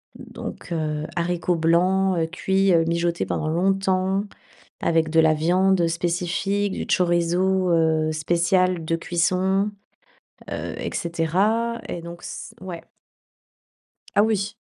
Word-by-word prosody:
Donc, - - -9
heu, 155 -2 -2
haricots 175 +1 0
blancs, 180 +3 +2
heu, 165 -1 +1
cuits, 190 +3 +1
heu, 165 -1 +4
mijotés 170 +1 0
pendant 155 - -2
longtemps, 190 +3 +1 0.6
avec 165 -1 +1
de 160 +1 +4
la 160 -1 +4
viande 180 +3 +2
spécifique, 180 +4 -1
du - - -4
chorizo, 180 +1 +2
heu, 160 -2 +2
spécial 175 +2 +1
de 165 +1 0
cuisson, 185 +4 +1 0.8
heu, - - -4
et - - -5
cetera, 200 +8 0
et 170 - -5
donc, 170 +1 -9
s - - -8
ouais. 180 -3 -7 1.3
Ah - - +6
oui. 210 -1 0
175 Hz, 125 wpm, -23 LUFS, 165-190 Hz, 1.3 s, Ah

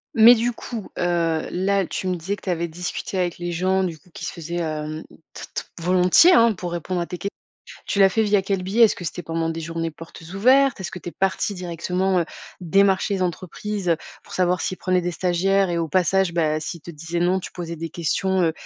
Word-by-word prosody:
Mais 230 +2 +9
du 235 +1 0
coup 230 -2 -7
heu 170 -2 0
là, 195 +1 +1
tu 185 - -4
me 180 - 0
disais 180 +4 -3
que 205 - -18
tu - - -4
avais 170 -1 0
discuté 175 +3 -5
avec 175 -2 -1
les 175 0 -4
gens 185 +3 +1
du 170 -3 -3
coup 180 - -24
qui - - -7
se - - -3
faisaient, 170 0 -6
hem, 155 -1 -3 0.3
t - - -8
t - - -3 0.2
volontiers, 180 - +6
hein 230 -5 +6
pour 175 -2 -6
répondre 175 +1 -2
à - - -1
tes 180 - -6
que 200 - -4 0.6
tu - - -1
l'as 195 -1 +7
fait 220 +3 +1
via 205 -2 +3
quel 195 -1 -1
biais? 200 +6 +2
Est-ce 220 - +3
que 175 - -8
c'était 175 - -4
pendant 165 0 -2
des 165 0 -4
journées 165 0 -3
portes 165 +1 -12
ouvertes? 260 +4 +4
Est-ce 185 - -4
que - - -7
tu 175 - -8
es - - -20
partie 195 +1 0
directement, 180 +1 -1
heu, - - +1 0.4
démarcher 195 +3 +3
les 190 - -1
entreprises, 185 +3 -3
heu, 165 - +4 0.3
pour - - -12
savoir 180 -1 +1
s'ils 185 - -2
prenaient 185 -1 +1
des 175 - -1
stagiaires 185 +3 +1
et 170 - 0
au 165 -1 -1
passage, 185 +1 +2
bah 155 -2 +1
s'ils 165 +2 -5
te 170 - -9
disaient 165 +2 -4
non, 180 +2 +2
tu - - -8
posais 170 -2 -6
des 165 +1 -5
questions, 190 +3 0
heu, 165 -2 +2
180 Hz, 240 wpm, -23 LUFS, 170-195 Hz, 0.6 s, Mais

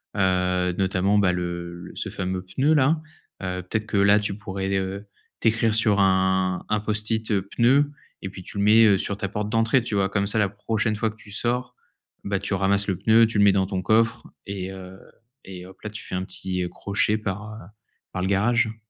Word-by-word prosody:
Heu, 90 -2 +1
notamment, 95 +1 +1
bah, 100 -3 +3
le 85 -1 -5
ce - - -4
fameux 95 0 -3
pneu-là, 145 - +2 0.4
heu, 90 0 -3
peut-être 110 +4 -3
que, 105 - -1
là, 100 +1 +5
tu 105 -2 -3
pourrais, 95 -1 -3
heu, 95 +2 -4 0.3
t'écrire 115 0 +2
sur 110 -3 +3
un 95 -1 +2
un 105 - +1
Post-it 110 +1 -1 0.2
«pneu» 140 +5 +4 0.3
et 95 - -5
puis, 95 0 -10
tu 100 - -10
le 100 - +1
mets, 110 +2 +6
heu, 100 -3 +5
sur 100 +1 -3
ta 100 - -2
porte 105 +1 -3
d'entrée, 115 +3 +2
tu 115 - -5
vois? 95 -1 +1
Comme 100 0 0
ça, 110 +2 +1
la 100 -2 +2
prochaine 110 +2 -1
fois 110 +1 0
que - - -18
tu 105 -2 -15
sors, 125 +4 -1 0.5
bah, 100 -1 -1
tu 100 +1 -4
ramasses 100 +2 +1
le 95 - -1
pneu, 115 +3 +5
tu 110 -1 -3
le 100 - +5
mets 100 - +7
dans 95 -1 +1
ton 95 -1 -2
coffre 115 +3 +2 0.2
et 95 -1 -4
heu, 95 0 -10 0.5
et 90 -1 -9
hop-là! 95 +3 -9
Tu 105 - -8
fais - - -6
un 90 - -1
petit 90 -1 -3
crochet 100 +2 0
par, 105 +1 -5
heu, - - -9 0.6
par 90 - -3
le - - 0
garage. 110 +3 +2
100 Hz, 205 wpm, -24 LUFS, 95-110 Hz, 0.6 s, mets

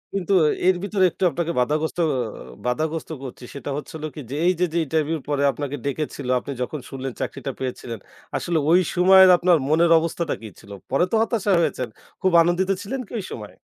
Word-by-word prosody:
কিন্তু 195 0 0 0.3
এর 185 - +5
ভিতরে 200 -2 +2
একটু 190 - -5
আপনাকে 170 -1 -2
বাধাগ্রস্ত 150 +6 0 0.7
বাধাগ্রস্ত 155 +7 -2
করছি। 130 -1 -9
সেটা 140 - -6
হচ্ছে 150 - -8
হলো 155 0 -4
কি? - - -7
যে - - -3
এইযে 180 0 +3
যে - - 0
ইন্টারভিউ 160 +2 0
পরে 145 -1 +1
আপনাকে 145 +2 -4
ডেকেছিল। 140 -1 -3
আপনি 140 - -7
যখন 145 +4 -3
শুনলেন 135 -1 -5
চাকরিটা 135 - -4
পেয়েছিলেন। 125 -3 -5 0.4
আসলে 170 -1 -1
ওই 175 - +7 0.2
সময়ের 190 +1 +7
আপনার 175 -1 +4
মনের 165 +2 +4
অবস্থাটা 165 0 -2
কি 110 - -8
ছিল? 100 - -15 0.2
পরে 135 +6 +3
তো - - +2
হতাশা 225 -3 0
হয়েছেন। 130 -6 -1 0.3
খুব 185 - +2
আনন্দিত 175 +3 +1
ছিলেন 265 +7 -4
কি - - -14
ঐ - - -3
সময়ে? 105 -2 -8
160 Hz, 185 wpm, -23 LUFS, 140-180 Hz, 0.7 s, ওই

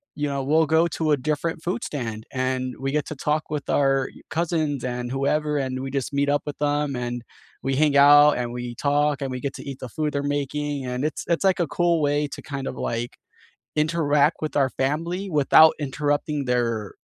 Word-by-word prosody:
you 145 0 -1
know, 140 -1 -2
we'll 155 +4 +3
go 160 +1 +3
to 155 0 -1
a 145 - +4
different 155 +4 -2
food 195 +8 -2
stand, 115 -6 -5
and 130 0 -1
we 135 0 -2
get 150 -1 0
to 155 - -5
talk 150 +2 -1
with 150 -2 -4
our 135 -1 +2 0.2
cousins 160 -5 -1
and 125 0 -3
whoever, 150 +3 0
and 130 -2 -2
we 135 - -5
just 135 0 -3
meet 140 0 +1
up 145 0 +1
with 145 - -5
them, 145 -1 0
and 120 -1 -4 0.4
we 135 0 0
hang 145 0 +3
out, 145 +1 +8
and 120 -1 -3
we 120 -1 -5
talk, 145 +2 +1
and 135 - -2
we 125 - -5
get 140 +1 -3
to - - -8
eat 135 -1 -7
the 130 - -7
food 150 +4 -2
they're 140 0 -1
making, 145 0 -3
and 125 +2 -3
it's 155 - -3
it's 170 +2 +1
like, 190 -1 +3
a 170 - 0
cool 170 -1 +1
way 145 0 +1
to - - -8
kind 140 -1 -5
of, - - -4
like, 115 +1 -3 0.6
interact 150 -1 +2
with 155 - -3
our 135 -2 +3
family 165 - -2
without 155 +1 +6
interrupting 145 0 -1
their 115 -4 -1
145 Hz, 210 wpm, -24 LUFS, 130-150 Hz, 0.6 s, out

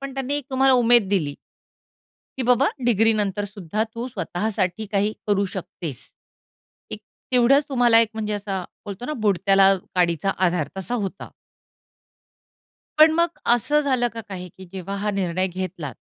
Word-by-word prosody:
पण 275 -1 -7
त्यांनी 270 +1 -2
एक 290 - -4
तुम्हाला 265 0 +4
उमेद 240 -4 +4
दिली 155 -8 0 1.0
की 260 - 0
बाबा 250 +3 +3 0.2
डिग्रीनंतर 210 -3 +2
सुद्धा 205 +1 -3
तू 235 +2 -4
स्वतःसाठी 205 0 -2
काही 205 +2 +1
करू 200 -1 +2
शकतेस. 165 -7 -5 0.8
एक - - -6 0.3
तेवढ्याच 255 +4 +5
तुम्हाला 245 -4 +4
एक 230 - +2
म्हणजे 215 -1 -3
असा 200 -2 -3 0.2
बोलतो 205 +3 -7
ना, 305 - -3
"बुडत्याला 195 -1 +4 0.2
काडीचा 175 +1 +1 0.2
आधार" 170 -4 -1
तसा 215 +6 -3
होता. 200 -4 -4 1.7
पण 310 +1 +8
मग 340 +1 0 0.2
असं 295 +6 +1
झालं 255 -4 +1
का 225 - -5
काही? 180 -2 -7
की 190 +3 -14
जेव्हा 195 +1 -5
हा 210 +1 -1
निर्णय 185 -2 -1
घेतलात 175 -6 -5
205 Hz, 145 wpm, -23 LUFS, 190-245 Hz, 1.7 s, पण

